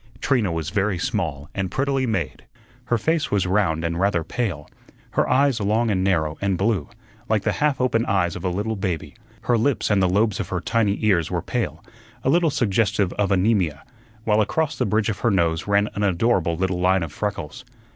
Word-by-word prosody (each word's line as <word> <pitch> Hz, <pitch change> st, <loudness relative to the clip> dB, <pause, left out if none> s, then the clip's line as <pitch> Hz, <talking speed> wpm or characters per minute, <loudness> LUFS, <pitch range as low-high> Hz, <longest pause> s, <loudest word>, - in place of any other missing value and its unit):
Trina 120 Hz, -9 st, +1 dB
was 80 Hz, 0 st, -3 dB
very 100 Hz, 0 st, 0 dB
small 85 Hz, -, -2 dB
and 95 Hz, -2 st, -2 dB
prettily 135 Hz, +4 st, 0 dB
made. 85 Hz, -, -3 dB, 0.4 s
Her 120 Hz, -1 st, +1 dB
face 160 Hz, +5 st, 0 dB
was 100 Hz, -3 st, +1 dB
round 90 Hz, -4 st, +1 dB
and 85 Hz, 0 st, -2 dB
rather 95 Hz, -3 st, +1 dB
pale; 90 Hz, -9 st, -3 dB, 0.4 s
her -, -, +1 dB
eyes 135 Hz, -2 st, +3 dB
long 110 Hz, +3 st, +1 dB
and 95 Hz, -2 st, +1 dB
narrow 80 Hz, -5 st, 0 dB
and 100 Hz, -2 st, 0 dB
blue, 100 Hz, -5 st, 0 dB, 0.4 s
like 110 Hz, -2 st, +1 dB
the -, -, +1 dB
half 145 Hz, -2 st, 0 dB
open 125 Hz, -3 st, +2 dB
eyes 90 Hz, -4 st, +1 dB
of -, -, -7 dB
a 90 Hz, -, 0 dB
little 105 Hz, +5 st, -2 dB
baby; 95 Hz, -5 st, -3 dB, 0.3 s
her 120 Hz, -1 st, +1 dB
lips 115 Hz, -2 st, +1 dB
and 100 Hz, -2 st, +3 dB
the 95 Hz, -, +3 dB
lobes 105 Hz, +1 st, +1 dB
of -, -, -3 dB
her 90 Hz, -, -1 dB
tiny 105 Hz, +3 st, +1 dB
ears 90 Hz, -7 st, +2 dB
were -, -, -2 dB
pale, -, -, -3 dB, 0.4 s
a -, -, +1 dB
little 170 Hz, +1 st, +3 dB
suggestive 105 Hz, -6 st, +1 dB
of 105 Hz, -1 st, 0 dB
anaemia; 95 Hz, -6 st, +1 dB, 0.4 s
while 110 Hz, -1 st, +3 dB
across 155 Hz, +8 st, 0 dB
the -, -, -1 dB
bridge 110 Hz, +2 st, +1 dB
of 100 Hz, -, -3 dB
her 120 Hz, -, +2 dB
nose 85 Hz, -4 st, +1 dB
ran 100 Hz, +1 st, +3 dB
an 100 Hz, -, -3 dB
adorable 95 Hz, -3 st, +1 dB
little 90 Hz, 0 st, -1 dB
line 90 Hz, 0 st, +2 dB
of 80 Hz, -, -5 dB
freckles. 100 Hz, -8 st, -4 dB
100 Hz, 200 wpm, -23 LUFS, 90-115 Hz, 0.4 s, eyes